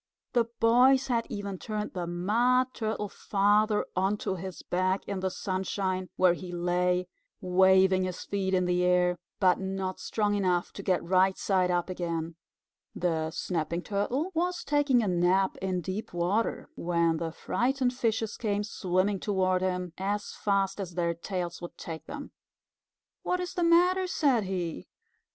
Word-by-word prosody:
The 240 -2 +3
boys 255 +4 +5
had 235 -2 0
even 200 -2 -5
turned 210 -1 -4
the 175 -2 -3
Mud 240 +9 +2
Turtle 215 -2 -2
Father 210 +2 +2
onto 195 +1 0
his 185 0 -7
back 185 +2 0
in 200 - -3
the 190 0 -1
sunshine, 185 0 -2
where 185 -2 +4
he 180 0 -7
lay, 180 +1 0 0.3
waving 190 0 +4
his 185 -1 -5
feet 190 -1 -1
in 180 -1 +2
the 180 0 +1
air, 180 -1 +3 0.2
but 185 -2 +4
not 190 -1 -3
strong 210 -2 0
enough 180 -3 0
to - - -7
get 185 -2 +1
right 185 +2 +3
side 185 -2 +1
up 175 -1 +1
again. 170 -3 -3 0.6
The 160 -2 0
Snapping 170 +1 -2
Turtle 245 - -1
was 355 +2 -1
taking 285 -5 +2
a - - -1
nap 180 +2 +2
in 185 -1 -2
deep 190 +4 -5
water, 185 +6 0
when 170 -1 +1
the 165 0 -3
frightened 250 +8 0
fishes 225 -3 -1
came 205 -2 -1
swimming 190 0 0
toward 185 -2 +1
him 180 -2 -2
as 205 +2 -2
fast 195 -1 0
as 180 -3 -5
their 170 -1 +1
tails 175 0 -4
would 175 - -8
take 160 -1 -7
them. 290 0 -7 0.9
"What 360 - -1
is 360 0 -4
the 355 -2 -1
matter?" 360 +2 +4
said 270 - +2
he. 175 - -4
190 Hz, 155 wpm, -29 LUFS, 180-215 Hz, 0.9 s, boys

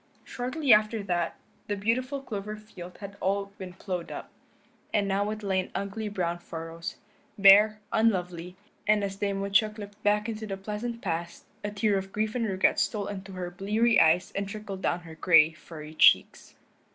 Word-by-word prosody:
Shortly 255 +1 +1
after 215 0 +3
that 175 -3 -1 0.3
the 205 - -1
beautiful 255 +7 -1
clover 210 -3 -5
field 185 -4 -11
had 200 0 -8
all 200 +1 -1
been 185 -2 -7
plowed 180 -2 -5
up, - - -7 0.6
and 205 -2 +1
now 200 +1 0
it 215 0 -5
lay 190 -2 +1
in 185 - -3
ugly 205 +2 -3
brown 175 -4 -2
furrows, 165 +1 -7 0.4
bare, 205 +2 +7
unlovely, 180 -6 0 0.3
and 210 -1 +4
as 195 -1 -3
Dame 200 -1 -1
Woodchuck 210 +2 +2
looked 205 0 -10
back 210 +1 +2
into 220 -1 -5
the 195 -1 -4
pleasant 215 +4 -5
past 170 -2 -4 0.2
a 205 - -2
tear 205 -1 +1
of 195 0 -8
grief 215 +1 -1
and 235 -3 -1
regret 190 -1 +2
stole 210 -3 0
into 195 -1 -7
her 180 -1 -5
bleary 215 +5 +2
eyes 165 +3 +3
and 200 0 -3
trickled 205 -2 -6
down 175 -2 0
her 165 -2 -11
gray, 160 -1 +5
furry 155 -1 -11
cheeks. - - +4
200 Hz, 175 wpm, -28 LUFS, 180-215 Hz, 0.6 s, bare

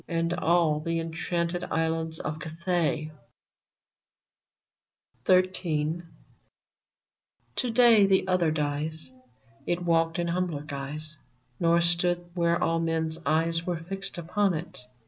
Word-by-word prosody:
And 165 0 0
all 170 -3 +2
the 165 +2 -1
enchanted 170 +1 -2
islands 160 0 -1
of 155 +1 -4
Cathay! 160 -1 -1 2.1
VERMONT 185 0 +6 0.2
123 170 -4 -1
XIII. 155 +3 -1 1.5
To 250 - 0
day 230 -3 +6
the 190 -1 +3
other 180 -3 +2
dies. 155 0 -2 0.6
It 175 0 -1
walked 165 -1 +2
in 170 0 -1
humbler 170 -4 -1
guise, 150 +1 -6 0.4
Nor 170 0 +4
stood 175 +1 +1
where 170 -1 +2
all 165 0 +1
men's 165 -1 -1
eyes 165 +2 +1
Were 175 -2 0
fixed 190 +3 -6
upon 180 +2 +1
it. 160 +3 -6
165 Hz, 120 wpm, -27 LUFS, 160-175 Hz, 2.1 s, VERMONT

